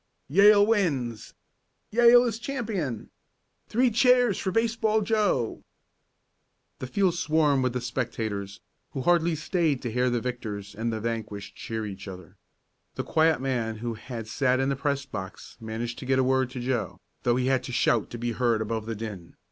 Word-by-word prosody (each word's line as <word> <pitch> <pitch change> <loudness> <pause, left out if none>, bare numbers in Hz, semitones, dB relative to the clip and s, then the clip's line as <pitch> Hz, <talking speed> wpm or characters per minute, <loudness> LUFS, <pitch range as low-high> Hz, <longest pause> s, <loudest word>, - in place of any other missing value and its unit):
"Yale 205 +5 +7
wins!" 145 - -1 0.6
"Yale 240 +1 +7
is 230 -2 -2
champion!" 215 - -4 0.6
"Three 245 +2 +2
cheers 245 -2 +4
for 190 - -2
Baseball 225 0 +1
Joe!" 200 - 0 1.2
The 130 - -5
field 185 +6 +1
swarmed 155 -5 +2
with 130 -1 0
the 125 - -2
spectators, 110 -5 -4 0.3
who 135 - -3
hardly 170 +2 +3
stayed 160 -3 0
to 120 - -3
hear 125 +2 +1
the 120 -1 0
victors 110 -5 -5
and 115 +3 -2
vanquished 110 -2 -4
cheer 110 -1 -4
each 100 -1 -8
other. 90 -2 -10 0.6
The - - -3
quiet 160 -4 +2
man 120 -4 -1
who 115 +2 -4
had 115 0 -7
sat 130 +2 +1
in 135 +1 +1
the 140 - 0
press 140 0 -1
box 95 -8 -8
managed 115 +1 -5
to 130 - -8
get 135 0 +2
a 130 - +3
word 130 -1 +2
to 130 0 -7
Joe, 125 -2 -2 0.2
though 120 -1 +2
he 125 0 0
had 130 -1 +2
to - - -6
shout 120 -2 +2
to 120 - -7
be 120 0 -2
heard 115 -1 +1
above 110 0 -3
the 115 - -3
din. 105 -6 -7
125 Hz, 170 wpm, -27 LUFS, 115-175 Hz, 1.2 s, Yale